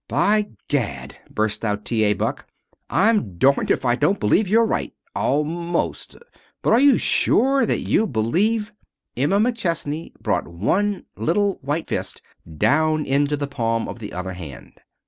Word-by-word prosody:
"By 210 0 +2 0.2
Gad!" 70 - -2
burst 110 -1 -1
from 105 -2 -2
T. 115 -2 -1
A. 105 - +3
Buck, 100 - -3 0.4
"I'm 190 - +2
darned 140 +8 +3
if - - +1
I 120 - +3
don't 150 +10 +1
believe 210 0 +2
you're 225 +4 +4
right - - -2 0.2
almost 165 +4 -1 0.5
But - - +3
are 230 - +5
you 275 -2 +6
sure 265 0 +2
that - - 0
you 220 - +1
believe 205 - 0 0.2
" - - -61
Emma 145 +10 +1
McChesney 170 -9 -2
brought - - -1
one 185 - -1
little 200 +4 0
white 145 +4 -2
fist - - -4 0.3
down 155 - +2
into 145 +2 +1
the 145 - -2
palm 115 -5 -1
of - - -7
the 105 -2 -7
other 90 +1 -5
hand. 80 -8 -11
150 Hz, 155 wpm, -22 LUFS, -, 0.5 s, you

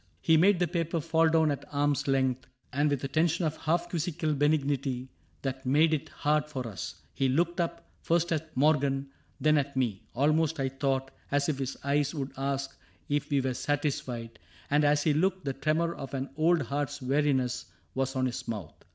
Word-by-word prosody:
He 160 - +4
made 185 +4 +5
the 175 0 +1
paper 165 0 -1
fall 160 +1 +3
down 160 -1 +3
at 140 - -3
arm's 145 -1 +1
length 130 -2 +1
\ - - -39
And 145 +2 +2
with 145 -2 -1
a - - 0
tension 165 +4 +1
of 155 0 -1
half 170 +2 0
quizzical 165 -2 -1
Benignity 140 -3 0 0.3
that 135 -1 -3
made 150 +5 +4
it 150 - -2
hard 150 0 +1
for 130 -5 -4
us, 105 - -7
He 135 -1 +1
looked 170 +6 +1
up 170 0 -4
— - - -37
first 170 +1 +1
at 160 -3 -3
Morgan, 140 -1 +2 0.3
then 155 -1 +4
at 140 -1 -3
me 115 -7 0
— - - -36
Almost, 155 +3 +2
I 135 -1 +1
thought, 135 0 -1 0.2
as 145 +1 +1
if 140 -3 -1
his 135 0 -3
eyes 145 +2 +1
would 140 -2 -3
ask 135 0 -2 0.3
If 145 0 0
we 140 -2 +2
were 130 0 -1
satisfied; 130 -4 -2 0.3
and 145 +1 +4
as 145 0 +3
he 155 - +3
looked. 185 +4 +1
The 135 - -1
tremor 155 +5 0
of 135 -3 -7
an 135 0 -3
old 160 +1 +3
heart's 145 0 -2
weariness 130 -2 +1 0.3
Was 135 0 -1
on 130 0 +1
his 125 -1 -3
mouth. 100 -9 -5
145 Hz, 200 wpm, -29 LUFS, 135-160 Hz, 0.3 s, made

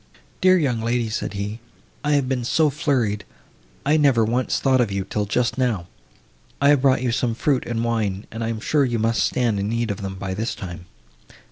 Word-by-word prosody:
"Dear 185 0 +6
young 130 -9 0
lady," 115 0 0
said 110 - -3
he, 105 +2 -4 0.4
"I 150 0 +1
have 140 -3 +2
been 130 -2 -1
so 150 +5 +2
flurried, 125 -8 0 0.6
I 150 +3 +4
never 135 -7 +4
once 120 +3 0
thought 130 -2 +3
of 115 -4 0
you 100 0 -1
till 105 0 -2
just 125 +5 0
now. 115 -9 0 0.7
I 140 - +4
have 145 -3 +5
brought 130 -2 +3
you 125 - +1
some 115 -1 0
fruit 135 +1 0
and 115 0 -1
wine, 110 -4 -1
and 110 +1 -4
I - - -1
am 115 -1 -3
sure 150 +3 +2
you 120 -3 0
must 115 +1 +1
stand 115 -5 +1
in 100 +1 -1
need 115 -1 -1
of 100 +1 -5
them 95 -1 -4
by 95 0 -4
this 110 +4 -3
time." 90 -4 -8
115 Hz, 215 wpm, -22 LUFS, 105-130 Hz, 0.7 s, Dear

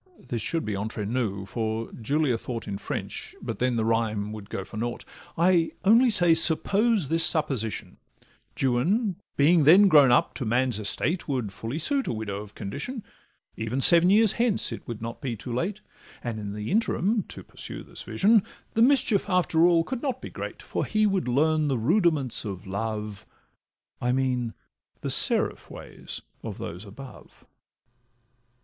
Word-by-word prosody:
(This 120 -2 -2
should 165 +9 -1
be 105 -2 -3
entre 105 +1 -4
nous, 105 -4 -2
for 110 +1 -3
Julia 140 +3 0
thought 115 0 -6
In 100 -1 -5
French, - - -5
but - - -6
then 125 -1 +1
the 110 -1 0
rhyme 110 -2 -1
would 105 -2 -9
go 95 - -4
for - - -12
naught.) 120 +2 -4 0.3
I 170 -1 +2
only 230 +5 +5
say 175 -6 +4
suppose 195 - +4
this 165 0 +2
supposition: 130 -10 0 0.6
Juan 175 - +1 0.2
being 155 +3 +4
then 185 +8 +7
grown 145 -7 +6
up 120 - +3
to 135 - -4
man's 120 0 0
estate 155 - +1
Would 125 -8 -3
fully 115 +8 -5
suit 270 - 0
a - - -1
widow 105 -2 -5
of 105 0 -13
condition, 145 - -6 0.5
Even 115 +4 -3
seven 170 +5 +6
years 215 +1 +5
hence 235 -3 0
it - - -8
would 115 -2 -6
not 115 +1 -6
be 125 -4 -3
too 120 +3 -7
late; 190 - -3 0.4
And 115 -3 -4
in 100 -1 -6
the 105 0 -5
interim 215 0 +1
(to - - -9
pursue - - -8
this - - -10
vision) 215 +2 +3 0.3
The 225 - +1
mischief, 230 -6 +3
after 175 -2 +3
all, 170 -2 +3
could 255 +6 -5
not 270 -3 -2
be - - -9
great, - - -7
For - - -3
he 215 0 +1
would 195 -7 0
learn 155 +4 +2
the 135 -3 0
rudiments 155 - +1
of 100 -2 -7
love, 105 +1 -5 0.7
I 125 0 +1
mean 125 -3 -1 0.5
the - - -2
seraph - - +3
way - - -12 0.4
of - - -6
those 90 +5 -7
above. 125 +6 -13
130 Hz, 170 wpm, -26 LUFS, 110-180 Hz, 0.7 s, then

